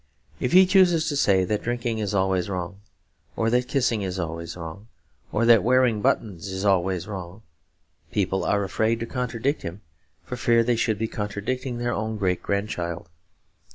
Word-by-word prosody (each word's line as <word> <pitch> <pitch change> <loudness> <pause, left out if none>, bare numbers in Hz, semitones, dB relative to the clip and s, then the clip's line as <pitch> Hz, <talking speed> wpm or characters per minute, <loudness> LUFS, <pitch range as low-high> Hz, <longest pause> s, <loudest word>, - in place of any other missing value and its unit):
If 125 - -1
he 185 +1 +8
chooses 180 -4 +4
to 145 - -2
say 95 -9 +3
that 105 +2 -1
drinking 120 -1 -2
is 105 -1 -2
always 95 -1 +1
wrong, 95 +1 -5 0.5
or 115 0 +1
that 125 +1 +2
kissing 120 -6 +1
is 95 -1 -3
always 85 -1 -5
wrong, 85 +5 -8 0.4
or 110 +2 +1
that 115 -3 +7
wearing 125 -2 +3
buttons 100 -3 0
is 95 +1 -4
always 95 -2 +1
wrong, 95 0 -7 0.7
people 95 -1 0
are 100 0 +1
afraid 110 +4 0
to - - -1
contradict 125 +3 -2
him 85 +5 -7 0.4
for 125 - -6
fear 115 -2 +3
they 120 +1 +1
should 110 -2 0
be 110 +2 -1
contradicting 110 +5 -3
their 120 0 -1
own 110 0 -3
great 90 -3 0
grandchild. 90 -5 -3
105 Hz, 170 wpm, -25 LUFS, 95-120 Hz, 0.7 s, he